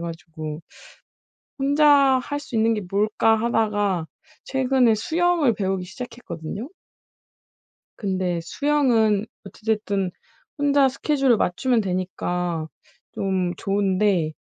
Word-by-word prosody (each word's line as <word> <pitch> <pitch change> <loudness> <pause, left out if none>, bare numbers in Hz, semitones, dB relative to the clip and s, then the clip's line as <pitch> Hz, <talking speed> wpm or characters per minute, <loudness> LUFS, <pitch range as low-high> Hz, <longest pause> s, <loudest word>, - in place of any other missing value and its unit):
가지고 160 -2 -7 1.0
'혼자 285 +2 +3 0.4
할 290 +3 -4
수 250 -5 -6
있는 225 +1 +3
게 210 - -3
뭘까?' 215 +2 +2
하다가 205 -6 0 0.4
최근에 260 -3 +2
수영을 330 0 +2
배우기 190 -2 -2
시작했거든요. 205 - -7 1.3
근데 185 -4 -1
수영은 230 - +2 0.2
어찌 215 - -14
됐든 205 -4 0 0.5
혼자 285 -1 +4
스케줄을 270 -3 +1
맞추면 235 +6 +1
되니까 180 -3 -2 0.5
좀 185 -2 -1
좋은데 195 -4 +1
210 Hz, 230 characters per minute, -23 LUFS, 185-255 Hz, 1.3 s, 혼자